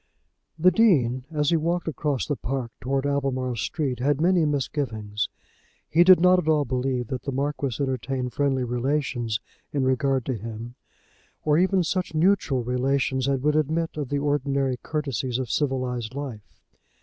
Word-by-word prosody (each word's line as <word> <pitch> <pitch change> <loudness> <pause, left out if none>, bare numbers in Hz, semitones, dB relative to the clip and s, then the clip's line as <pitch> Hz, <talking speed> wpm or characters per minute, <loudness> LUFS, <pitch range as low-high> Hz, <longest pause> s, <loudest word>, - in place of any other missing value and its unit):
The 180 +3 +5
Dean 130 - +3
as 150 -2 0
he 165 - +4
walked 170 +2 -1
across 150 -4 -1
the 145 - -1
park 130 -2 -3
towards 135 +2 -1
Albemarle 135 -3 -1
Street 130 +2 -2
had 140 +2 +1
many 175 0 +3
misgivings. 120 -8 -2 0.6
He 170 +2 +5
did 185 -1 +8
not 180 +1 +5
at 165 - -4
all 150 -2 +3
believe 125 -1 -1
that 130 -2 -3
the 140 - -4
Marquis 140 -1 -2
entertained 130 -1 -2
friendly 135 -2 +1
relations 125 -2 -1 0.3
in 140 -2 0
regard 130 -1 +1
to 130 - -1
him, 115 +1 -7 0.7
or 150 +1 +4
even 185 0 +3
such 180 -1 -2
neutral 155 -7 +2
relations 130 +1 0
as 135 -2 0
would 150 +2 +2
admit 160 +2 0
of 145 -4 -4
the 145 - 0
ordinary 140 -2 0
courtesies 135 -5 -2
of 130 -3 -3
civilized 130 -4 -1
life. 130 -8 -7
135 Hz, 160 wpm, -25 LUFS, 125-150 Hz, 0.7 s, did